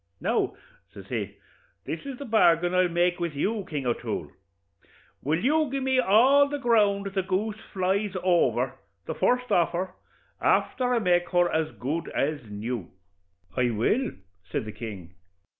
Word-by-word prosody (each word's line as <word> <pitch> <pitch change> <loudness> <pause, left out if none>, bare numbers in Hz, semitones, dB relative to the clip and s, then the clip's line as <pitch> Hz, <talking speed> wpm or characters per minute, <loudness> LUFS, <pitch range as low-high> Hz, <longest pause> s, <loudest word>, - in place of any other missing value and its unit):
Now,' - - 0 0.4
says - - -11
he, - - -3 0.5
'this - - -4
is 270 -2 -5
the 280 - -7
bargain 175 -6 +3
I'll 185 0 +4
make 175 +1 +1
with 170 -3 -2
you, 205 +8 -1
King 145 -4 -3
O'Toole: 120 -1 -2 0.9
will 155 +4 0
you 305 +1 +3
gi' 275 +1 -2
me 260 -1 +1
all 255 +6 +5
the 290 - -2
ground 205 -6 +2
the 195 - +1
goose 205 +4 -2
flies 195 +1 0
over, 180 -2 +2 0.3
the - - -3
first 250 0 +1
offer, 175 +2 +1 0.5
afther 250 -2 +2
I - - +3
make 175 -5 +2
her 175 -1 +3
as 160 -1 0
good 150 +7 -3
as 145 -5 -1
new?' 105 -1 -4 0.7
'I 125 -1 +2
will,' 120 - +1 0.4
says - - -2
the 110 - -6
king. 100 -7 -8
180 Hz, 155 wpm, -26 LUFS, 155-230 Hz, 0.9 s, all